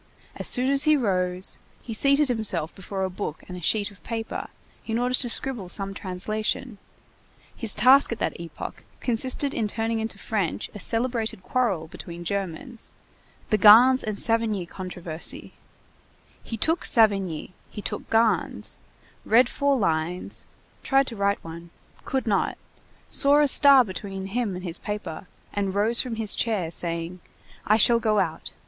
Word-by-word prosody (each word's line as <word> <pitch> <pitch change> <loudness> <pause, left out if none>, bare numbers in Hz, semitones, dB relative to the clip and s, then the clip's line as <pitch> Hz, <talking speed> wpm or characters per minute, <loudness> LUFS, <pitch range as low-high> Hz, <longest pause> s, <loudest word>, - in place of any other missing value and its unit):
As - - 0
soon 255 +1 +3
as 280 +1 +4
he 305 -1 +5
rose, 185 -5 0 0.2
he 230 - -6
seated 280 +6 +3
himself 210 -10 -2
before 190 0 -5
a 190 - -1
book 180 -4 -5
and 180 - -8
a 180 - -8
sheet 205 +4 +1
of 200 - -17
paper 225 -1 -5 0.4
in 225 0 -1
order 250 +1 0
to 250 -1 +1
scribble 230 -6 -1
some 195 +2 -3
translation; 215 +4 -3 0.8
his 225 -4 +2
task 255 +6 +5
at 230 - -2
that - - -3
epoch 170 - -8 0.2
consisted 255 +4 0
in 220 - -1
turning 225 +1 -2
into 220 -2 -4
French 200 -5 -3
a 210 - -8
celebrated 225 -2 -1
quarrel 200 -11 0
between 170 +1 -9
Germans, 200 +5 -4 0.6
the 215 - +3
Gans 240 +6 +8
and 215 -1 -3
Savigny 225 -5 0
controversy; 175 -2 -5 0.9
he 225 - -6
took 325 +9 0
Savigny, 195 -7 +2 0.2
he 210 - -8
took - - -5
Gans, 225 0 0 0.4
read 235 +3 +4
four 280 -1 +1
lines, 170 -3 -1 0.3
tried 270 0 +3
to 235 - -6
write 200 0 0
one, 170 +1 -9 0.4
could 265 -1 -1
not, 205 -4 0 0.5
saw 285 +1 +4
a 295 - +4
star 275 -1 +7
between 190 0 -6
him 205 -1 -2
and 180 - -7
his 170 -2 -5
paper, 195 -5 -6 0.3
and 200 -1 -2
rose 220 +4 +3
from 250 -3 -4
his 220 -3 0
chair, 200 -8 -1
saying: 170 +1 -4 0.5
"I 215 - +5
shall 235 +1 +5
go 215 -2 +1
out. 165 -5 -2
215 Hz, 155 wpm, -25 LUFS, 185-240 Hz, 0.9 s, Gans